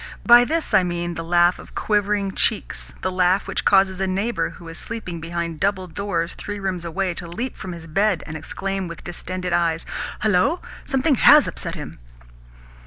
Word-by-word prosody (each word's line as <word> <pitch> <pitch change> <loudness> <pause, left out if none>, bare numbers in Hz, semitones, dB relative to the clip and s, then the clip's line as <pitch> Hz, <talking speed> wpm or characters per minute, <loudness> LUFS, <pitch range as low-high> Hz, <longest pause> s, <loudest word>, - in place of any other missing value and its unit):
By 240 0 +8
this 320 -2 -1
I 195 - +7
mean 175 -1 -2
the 165 - -5
laugh 175 +1 +3
of - - -13
quivering 205 -2 0
cheeks, 220 +2 0
the 185 - 0
laugh 185 +1 +2
which - - -2
causes 190 -1 +4
a 190 - +1
neighbour 200 +6 -1
who 170 - -12
is 165 +1 -6
sleeping 185 -8 -5
behind 170 -1 -4
double 195 0 0
doors 175 -2 -2
three 205 0 -6
rooms 190 -3 -3
away 180 +2 -2
to 170 0 -6
leap 230 +10 -4
from 190 - -7
his 170 -1 -9
bed 195 +3 +1
and 155 - -7
exclaim 195 +5 -4
with 170 -1 -9
distended 180 +1 -4
eyes, 165 -1 +1 0.4
"Hullo! 215 - +3 0.3
Something 270 0 +2
HAS 295 0 +8
upset - - -3
him!" - - -8
185 Hz, 180 wpm, -22 LUFS, 170-205 Hz, 0.4 s, By